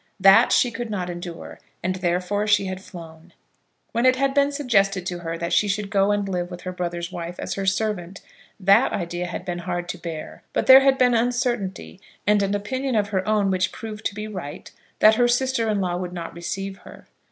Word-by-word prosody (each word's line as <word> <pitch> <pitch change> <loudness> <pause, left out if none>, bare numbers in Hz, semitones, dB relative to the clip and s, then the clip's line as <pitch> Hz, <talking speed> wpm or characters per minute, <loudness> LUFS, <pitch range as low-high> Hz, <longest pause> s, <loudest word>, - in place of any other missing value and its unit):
That 195 +5 +6
she 245 - +3
could 230 +1 -5
not 180 -4 -3
endure, 175 -1 -8 0.2
and 185 +1 -1
therefore 180 +4 -1
she 205 -1 +3
had 185 0 -5
flown. 165 -2 -12 0.6
When 235 +2 +2
it 255 - +5
had 270 +1 +1
been 280 0 +3
suggested 195 - +1
to 180 -1 -4
her 165 -1 -4
that 170 +1 -3
she 210 - +3
should 200 0 -2
go 195 -1 +3
and 205 -1 0
live 180 -2 -2
with 175 -1 -8
her 185 - -5
brother's 175 -1 -4
wife 175 -1 -6
as - - -3
her 195 -1 -3
servant, 195 -2 -1 0.4
that 200 +6 +4
idea 175 -1 -3
had 175 +1 -6
been 175 -1 -3
hard 175 0 -4
to - - -5
bear. 160 -3 -7
But - - 0
there 265 0 +10
had 270 0 +3
been 250 -1 +4
uncertainty, 235 -6 -1 0.2
and 210 0 +3
an 200 0 0
opinion 260 +5 -2
of 205 -1 +1
her 190 -1 -1
own 210 -2 +2
which 185 0 0
proved 215 -2 -8
to 200 - -9
be 210 +1 -5
right, 180 -9 -8 0.3
that 220 +1 +7
her 240 - +5
sister 240 -2 +1
in 205 -2 0
law 175 -1 -1
would 180 -1 -5
not 170 -2 -6
receive 195 +3 -5
her. - - -14
195 Hz, 215 wpm, -23 LUFS, 175-220 Hz, 0.6 s, there